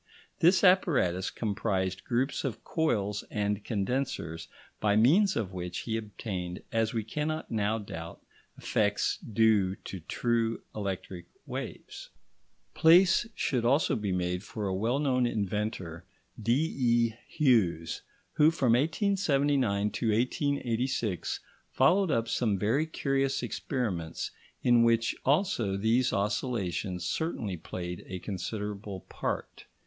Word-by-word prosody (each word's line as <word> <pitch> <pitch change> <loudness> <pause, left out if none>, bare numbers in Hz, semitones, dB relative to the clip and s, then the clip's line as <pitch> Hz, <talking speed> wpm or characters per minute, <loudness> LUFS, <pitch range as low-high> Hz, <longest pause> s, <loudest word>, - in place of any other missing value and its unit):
This 180 +5 +5
apparatus 140 - +3
comprised 95 -4 -2
groups 130 +3 0
of 125 -5 -4
coils 105 - 0
and 105 0 -1
condensers 100 -7 -2 0.3
by 105 -1 +2
means 175 - +5
of 100 -5 -2
which 90 -1 -4
he 110 - -3
obtained, 100 -5 -5
as 115 -1 +1
we 115 -2 -2
cannot 150 +7 -3
now 110 0 +1
doubt, 85 -6 -7 0.4
effects 105 -1 0
due 110 -4 +2
to 95 - -8
true 115 +6 -1
electric 95 -3 -5 0.2
waves. - - -7 0.6
Place 180 +7 +5
should 125 -4 0
also 135 +6 +3
be 105 -3 -2
made 90 0 -1
for 110 -1 -5
a 95 - -1
well 115 +7 0
known 130 -4 +2
inventor, 100 -6 -3 0.4
D.E. 120 -2 +2
Hughes, 105 - +2 0.3
who 150 +1 +5
from 135 -8 +2
1879 140 - +2
to 110 +3 -2
1886 120 - -1 0.3
followed 180 +8 +3
up 115 -5 +1
some 115 -3 +1
very 120 +11 +1
curious 135 -3 0
experiments 95 - -3 0.3
in 120 -1 +5
which 115 0 +3
also 135 - +1
these 115 +5 +2
oscillations 100 -4 -1
certainly 115 - -2
played 90 +1 -6
a 95 - -5
considerable 100 +1 -5
part. - - -5
110 Hz, 115 wpm, -29 LUFS, 100-135 Hz, 0.6 s, This